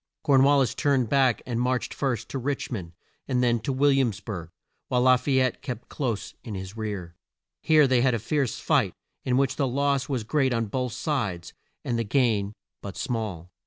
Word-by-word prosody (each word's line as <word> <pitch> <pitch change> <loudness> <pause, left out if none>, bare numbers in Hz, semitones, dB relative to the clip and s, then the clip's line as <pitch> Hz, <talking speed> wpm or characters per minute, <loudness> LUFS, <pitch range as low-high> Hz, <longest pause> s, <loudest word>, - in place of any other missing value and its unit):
Corn 140 -4 +5
wal 140 +1 +5
lis 130 -3 +2
turned 135 -4 +1
back, 130 -3 +3
and 120 -2 -2
marched 125 0 0
first 120 -5 -2
to 135 - -3
Rich 140 +2 -3
mond, 90 -8 -5 0.3
and 125 -1 +1
then 120 -1 +2
to 110 +5 -3
Will 140 +2 +3
iams 120 -7 +1
burg, 95 -5 -6 0.4
while 125 0 +1
La 130 0 +7
fay 130 +1 +1
ette 130 -2 0
kept 125 -3 -6
close 120 -8 -3
in 110 -5 -6
his 95 +1 -7
rear. 100 -6 -5 0.5
Here 155 -2 +5
they 130 -2 +3
had 125 -1 +3
a - - +1
fierce 130 +3 -1
fight, - - +1 0.3
in 125 -1 +1
which 135 -2 +1
the 140 - +1
loss 140 +2 0
was 130 -5 -1
great 130 +2 +1
on 115 0 0
both 125 +2 -3
sides, 105 - -2 0.3
and 120 -1 -1
the - - +1
gain 110 -4 +1 0.3
but 100 -2 -7
small. 100 -8 -4
125 Hz, 200 wpm, -26 LUFS, 110-135 Hz, 0.5 s, La